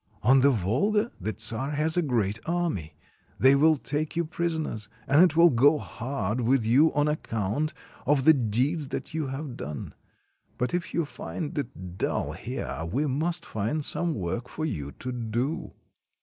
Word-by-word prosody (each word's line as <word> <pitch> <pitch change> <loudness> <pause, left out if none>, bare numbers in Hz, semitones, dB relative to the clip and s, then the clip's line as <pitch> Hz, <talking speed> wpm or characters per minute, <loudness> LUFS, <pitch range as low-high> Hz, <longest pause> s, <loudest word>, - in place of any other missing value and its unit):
On 130 +5 +6
the 140 +2 +5
Volga 140 - +1
the 105 +2 -2
czar 115 +6 -1
has 155 +2 +1
a 175 - +3
great 110 - 0
army; 170 - -1 0.4
they 130 +1 +6
will 155 +3 +5
take 150 +3 -3
you 170 0 +1
prisoners, 160 - -3 0.2
and 145 +4 +6
it 170 -4 +3
will 170 0 +7
go 140 +5 +5
hard 120 -4 -3
with 120 0 +2
you 140 +8 +5
on 145 0 +3
account 145 0 -1 0.4
of 140 -1 +3
the 160 - +9
deeds 135 +5 0
that 150 - -5
you 155 -3 -1
have 135 -1 -5
done. 75 -6 -6 0.6
But 125 0 -1
if 175 -1 -2
you 170 - +1
find 150 +1 -6
it 95 - -6
dull - - -1
here, 80 - -5
we 140 +6 +1
must 160 +5 -1
find 115 +9 -2
some 170 -2 0
work 100 +5 -3
for 155 - -3
you 75 - -3
to 125 - -6
do." 120 - -2
140 Hz, 170 wpm, -27 LUFS, 115-155 Hz, 0.6 s, the